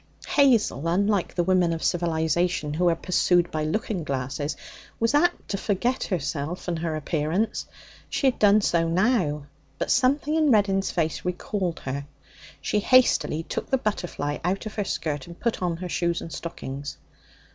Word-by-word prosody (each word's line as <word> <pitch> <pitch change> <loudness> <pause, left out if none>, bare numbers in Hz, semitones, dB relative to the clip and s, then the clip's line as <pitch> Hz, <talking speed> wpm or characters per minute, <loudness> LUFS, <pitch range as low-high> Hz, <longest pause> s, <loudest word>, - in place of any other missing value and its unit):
Hazel, 230 - +3
unlike 200 +2 +1
the 175 - +2
women 180 -1 +3
of 165 - -4
civilization, 165 -2 0
who 175 +3 +2
are 165 - +2
pursued 175 0 +2
by 155 -1 -1
looking 205 - -2
glasses, 140 +1 -3 0.4
was 230 +3 +2
apt 350 +4 +2
to 195 - -2
forget 240 +7 0
herself 165 -1 -3
and 170 -2 -1
her 160 -1 -2
appearance. 160 +7 -1 0.4
She - - -1
had 260 - +2
done 210 0 +5
so 170 -4 +2
now. 175 - +1 0.3
But - - -1
something 275 +4 +2
in 315 -2 +3
Reddin's 200 -4 +3
face 160 -3 -1
recalled 180 -1 -2
her. 140 +2 -4 0.5
She 210 - 0
hastily 240 -9 +3
took - - -5
the 265 - +3
butterfly 175 - -3
out 190 +5 -1
of 215 - -5
her 205 - -2
skirt 145 -7 -3
and 170 0 -11
put 235 -4 -1
on 175 -2 -1
her 180 +1 -6
shoes 170 0 0
and 165 - -8
stockings. 145 -4 -6
175 Hz, 165 wpm, -25 LUFS, 160-210 Hz, 0.5 s, done